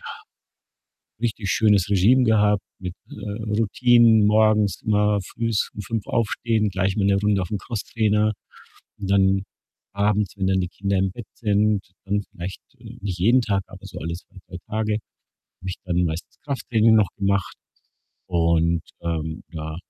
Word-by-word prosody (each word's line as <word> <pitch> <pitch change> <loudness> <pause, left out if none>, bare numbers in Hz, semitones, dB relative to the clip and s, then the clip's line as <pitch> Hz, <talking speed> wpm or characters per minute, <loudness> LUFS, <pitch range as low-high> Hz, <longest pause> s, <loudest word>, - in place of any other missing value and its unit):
ja, - - -13 1.1
richtig 110 -4 -2
schönes 105 -3 +3
Regime 110 +7 +4
gehabt 105 -3 +3 0.2
mit, 90 -1 -6 0.2
äh, 105 +1 -6 0.2
Routinen 115 0 +5
morgens 105 -1 +3
immer 105 -1 +2
frühs 115 +2 -2
um 105 - -7
5 105 +1 -4
aufstehen, 115 -1 0
gleich 95 +1 -1
mal 100 - +1
'ne 100 0 +4
Runde 100 0 +1
auf 90 - -6
'n 105 - -1
Crosstrainer 110 -1 0 0.7
und 100 -1 -4
dann 95 -1 +3 0.5
abends, 105 0 0
wenn 95 -1 -1
dann 95 0 +2
die 90 - -2
Kinder 100 +2 -2
im 95 0 +1
Bett 115 +1 -9
sind, 105 -2 +1 0.2
dann 100 +1 0
vielleicht, 90 +2 -7 0.2
äh - - -11
nicht 95 -3 -4
jeden 120 +8 +4
Tag, 100 -3 0
aber - - -13
so - - -8
alle 85 +1 -3
2, 90 +2 -13
3 90 - -7
Tage, 110 0 -1 0.5
habe 95 - -14
ich - - -4
dann 90 0 +1
meistens 85 +10 -5
Krafttraining 115 -5 +2
noch 105 -4 +4
gemacht 100 -1 0 0.7
und, 85 -1 +2 0.2
ähm, 80 -1 -3
ja 80 -1 -6
100 Hz, 160 wpm, -23 LUFS, 95-110 Hz, 1.1 s, Routinen